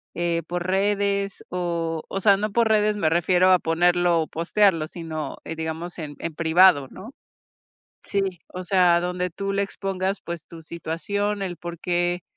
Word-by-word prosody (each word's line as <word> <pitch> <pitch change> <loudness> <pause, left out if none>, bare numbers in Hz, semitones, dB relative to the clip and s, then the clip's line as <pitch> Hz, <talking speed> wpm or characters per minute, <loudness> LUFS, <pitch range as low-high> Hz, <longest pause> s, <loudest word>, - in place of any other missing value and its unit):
eh, 170 -1 0
por 175 0 -3
redes 200 +1 0
o 170 -3 -2
o 195 - -2
sea, 200 0 +6
no 210 +1 -2
por 230 +2 +3
redes 210 -1 +3
me 160 -6 +2
refiero 180 +2 +3
a 185 - +6
ponerlo 175 +1 +2
o 155 - -3
postearlo, 170 -1 +2
sino, 160 -3 -6
eh, 165 - -5
digamos, 160 +2 -5
en 150 -2 -6
en 165 -2 -5
privado, 165 -3 +5
¿no? 225 +8 -11 0.9
Sí, 200 -1 0 0.3
o 185 - -7
sea, 180 -2 +4
donde 180 +1 -2
tú 195 +3 -3
le 200 0 +1
expongas, 195 0 -3
pues, 170 -2 -6
tu 165 -1 -12
situación, 200 +6 -3
el 180 -3 -4
porqué, 175 +1 -2
175 Hz, 165 wpm, -24 LUFS, 165-195 Hz, 0.9 s, sea